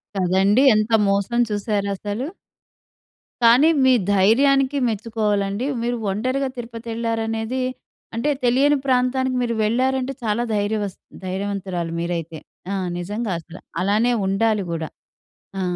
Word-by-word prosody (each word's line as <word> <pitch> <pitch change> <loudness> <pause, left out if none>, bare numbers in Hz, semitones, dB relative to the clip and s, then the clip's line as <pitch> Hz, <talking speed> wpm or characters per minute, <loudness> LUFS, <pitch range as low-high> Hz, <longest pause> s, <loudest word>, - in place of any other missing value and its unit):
కదండీ! 195 +6 +3
ఎంత 215 +1 0 0.2
మోసం 200 +4 +1
చూసారాసలు! 205 +2 -2 1.2
కానీ 240 +7 +6 0.2
మీ 260 - +6 0.2
ధైర్యానికి 270 +7 +3
మెచ్చుకోవాలండి. 210 -1 -1 0.2
మీరు 240 0 -1
ఒంటరిగా 255 +6 -1
తిరుపతి 230 -1 -8
వెళ్లారనేది 225 +2 -2 0.5
అంటే 235 +6 0
తెలియని 275 +4 +4
ప్రాంతానికి 260 0 +1
మీరు 235 -1 0
వెళ్ళారంటే 260 +4 0
చాలా 225 +2 0
ధైర్యవస్ 205 -1 -1 0.3
ధైర్యవంతురాలు 190 -3 -3
మీరైతే. 165 -2 -3 0.3
ఆహ్, 190 -2 -2
నిజంగా 205 +4 -3
అసలు! 170 +2 -12 0.2
అలానే 215 +5 +2 0.2
ఉండాలి 210 +1 +1
కూడా 160 -1 -3 0.7
ఆ! - - -1
220 Hz, 105 wpm, -22 LUFS, 195-245 Hz, 1.2 s, కానీ